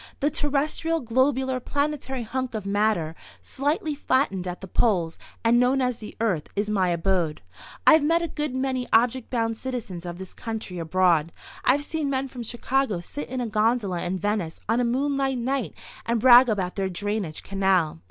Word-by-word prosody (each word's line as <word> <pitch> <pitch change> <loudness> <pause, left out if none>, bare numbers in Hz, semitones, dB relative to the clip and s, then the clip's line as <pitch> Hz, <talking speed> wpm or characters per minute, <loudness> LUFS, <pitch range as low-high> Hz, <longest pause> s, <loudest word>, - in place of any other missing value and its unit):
"The 290 +2 +1
terrestrial, 295 +4 0
globular, 260 +1 +1
planetary 285 -1 -2
hunk 255 +1 -3
of 210 -2 -4
matter, 200 -5 +1 0.3
slightly 295 +3 -1
flattened 260 -10 0
at 180 0 -4
the 190 - -8
poles, 175 -6 +1 0.2
and 235 +1 +4
known 255 +2 +3
as 250 -2 0
the 210 - -9
Earth, 195 -9 0
is 205 +1 -1
my 190 -3 +2
abode. 170 - 0 0.4
I've 315 -1 +7
met 335 +3 +2
a - - -1
good 300 -4 -3
many 260 -1 -1
object 245 +2 +3
bound 225 -2 -1
citizens 230 -9 -5
of 175 0 -6
this 190 0 -9
country 220 -6 -5
abroad. 165 -1 +2 0.3
I've 280 +3 +3
seen 310 -1 -2
men 270 0 -1
from 250 -1 -8
Chicago 240 -2 -1
sit 285 +12 -7
in 255 0 -3
a 240 - -2
gondola 215 -4 +1
in 180 +2 -2
Venice 200 -4 -2
on 225 +3 +2
a - - +2
moonlight 270 +2 0
night 255 +1 -2 0.3
and 235 0 0
brag 245 +1 +8
about 190 -4 -1
their 190 -1 0
drainage 200 -3 -3
canal. 190 - +1
230 Hz, 175 wpm, -25 LUFS, 190-265 Hz, 0.4 s, brag